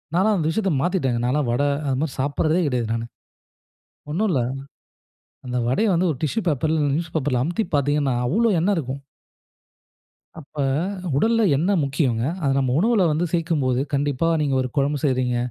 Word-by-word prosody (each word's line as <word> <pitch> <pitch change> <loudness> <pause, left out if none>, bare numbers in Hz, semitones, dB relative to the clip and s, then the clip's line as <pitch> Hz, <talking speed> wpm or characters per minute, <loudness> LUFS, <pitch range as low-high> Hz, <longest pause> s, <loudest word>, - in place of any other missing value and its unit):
நான்லாம் 205 +4 +3
அந்த 155 -2 0
விஷயத்த 195 +2 0
மாத்திட்டேங்க. 165 -10 0
நான்லாம் 130 0 0
வட 120 +4 +1 0.3
அதுமாரி 135 +2 -1
சாப்புட்றதே 155 +5 +1
கிடையாது 125 -4 -1
நானு. 115 0 -2 1.1
ஒன்னும் 210 +8 0
இல்ல. 135 - +1 1.1
அந்த 125 0 -3
வடைய 175 - +2
வந்து 175 +2 +2
ஒரு 130 - -9
டிஷ்யூ 155 +9 0
பேப்பர் 150 +1 0
ல 160 - +1
இல்ல 145 - +1
நியூஸ் 165 0 -4
பேப்பர்ல் 135 -4 0
அமுத்தி 175 - -1
பார்த்தீங்கன்னா, 145 -1 +1
அவ்ளோ 225 - +2
எண்ணெய் 200 +4 +2
இருக்கும். 135 -2 -4 1.4
அப்ப, 150 +1 -18 0.6
உடல்ல 230 +8 +2
எண்ணெய் 185 +6 +1
முக்கியங்க. 135 -5 0 0.2
அத 140 - +2
நம்ம 130 -2 +1
உணவுல 215 0 +3
வந்து 165 +4 0
சேர்க்கும்போது. 150 -7 0
கண்டிப்பா 145 +2 0
நீங்க 140 -3 0
ஒரு 125 - -3
குழம்பு 145 +1 +1
செய்றீங்க. 130 -3 +1
145 Hz, 160 wpm, -22 LUFS, 130-175 Hz, 1.4 s, நான்லாம்